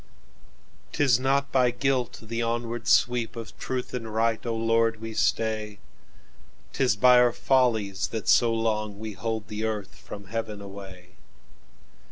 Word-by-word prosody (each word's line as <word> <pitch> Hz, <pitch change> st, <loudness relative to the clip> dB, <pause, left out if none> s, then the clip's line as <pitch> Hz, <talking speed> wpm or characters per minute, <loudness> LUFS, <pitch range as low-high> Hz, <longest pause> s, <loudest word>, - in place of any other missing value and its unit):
"'T -, -, +1 dB
is 125 Hz, -4 st, +4 dB
not 140 Hz, +2 st, +1 dB
by 130 Hz, -2 st, +4 dB
guilt 125 Hz, 0 st, -1 dB
the 115 Hz, +1 st, -3 dB
onward 115 Hz, 0 st, -2 dB
sweepOf 115 Hz, -2 st, +1 dB
truth 130 Hz, -1 st, -4 dB
and 115 Hz, -3 st, -4 dB
right, 115 Hz, 0 st, +1 dB
O 115 Hz, -, -1 dB
Lord, 115 Hz, 0 st, +1 dB
we 115 Hz, 0 st, -6 dB
stay;'T 105 Hz, -, -4 dB
is 125 Hz, -4 st, +3 dB
by 125 Hz, +3 st, +6 dB
our 125 Hz, -1 st, +5 dB
follies 110 Hz, -8 st, +1 dB
that 110 Hz, -2 st, -5 dB
so 120 Hz, -2 st, +5 dB
longWe 110 Hz, -2 st, -2 dB
hold 110 Hz, 0 st, -3 dB
the 105 Hz, +1 st, -5 dB
earth 105 Hz, -3 st, -3 dB
from 100 Hz, 0 st, -10 dB
heaven 105 Hz, +1 st, -4 dB
away. 95 Hz, -2 st, -10 dB
115 Hz, 140 wpm, -26 LUFS, 105-120 Hz, -, by